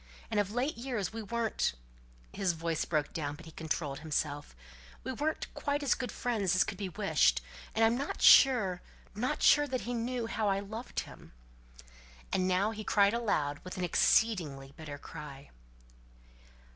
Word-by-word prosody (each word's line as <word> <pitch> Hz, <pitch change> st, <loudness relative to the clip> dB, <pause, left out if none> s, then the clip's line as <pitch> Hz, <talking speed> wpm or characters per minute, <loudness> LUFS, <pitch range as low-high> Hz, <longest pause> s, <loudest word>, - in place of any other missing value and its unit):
And 210 Hz, -, +2 dB
of 200 Hz, -2 st, +1 dB
late 245 Hz, +7 st, -1 dB
years 235 Hz, -5 st, -3 dB
we 225 Hz, -, -4 dB
weren't" 225 Hz, -, -1 dB, 0.6 s
his 195 Hz, -3 st, 0 dB
voice 165 Hz, -1 st, -2 dB
broke 150 Hz, -3 st, -1 dB
down, 145 Hz, -2 st, -3 dB
but 165 Hz, -, -13 dB
he 160 Hz, -, -11 dB
controlled 155 Hz, -3 st, -3 dB
himself 145 Hz, -, -3 dB, 0.5 s
"we -, -, -3 dB
weren't 300 Hz, +5 st, -2 dB
quite 285 Hz, 0 st, -2 dB
as 280 Hz, -, +3 dB
good 255 Hz, -, -4 dB
friends 205 Hz, -7 st, 0 dB
as 185 Hz, -, +5 dB
could 195 Hz, -, -6 dB
be 195 Hz, -2 st, -3 dB
wished; 60 Hz, -, +2 dB, 0.4 s
and 225 Hz, 0 st, +4 dB
I'm 225 Hz, +1 st, +3 dB
not 280 Hz, -, -3 dB
sure 210 Hz, -10 st, +6 dB, 0.3 s
not 250 Hz, +8 st, -2 dB
sure 295 Hz, -1 st, +6 dB
that 255 Hz, -2 st, -2 dB
he 245 Hz, -, -4 dB
knew 240 Hz, 0 st, -2 dB
how 225 Hz, -1 st, -1 dB
I 195 Hz, 0 st, +2 dB
loved 220 Hz, +5 st, -5 dB
him." -, -, -13 dB, 1.0 s
And 185 Hz, -1 st, +2 dB
now 190 Hz, +4 st, +2 dB
he 215 Hz, -1 st, -6 dB
cried 200 Hz, 0 st, +3 dB
aloud 150 Hz, -12 st, 0 dB
with 185 Hz, -, -7 dB
an 185 Hz, -, -2 dB
exceeding 180 Hz, -4 st, +3 dB, 0.2 s
bitter 155 Hz, -3 st, -8 dB
cry. 145 Hz, -2 st, -10 dB
200 Hz, 170 wpm, -31 LUFS, 160-235 Hz, 1.0 s, sure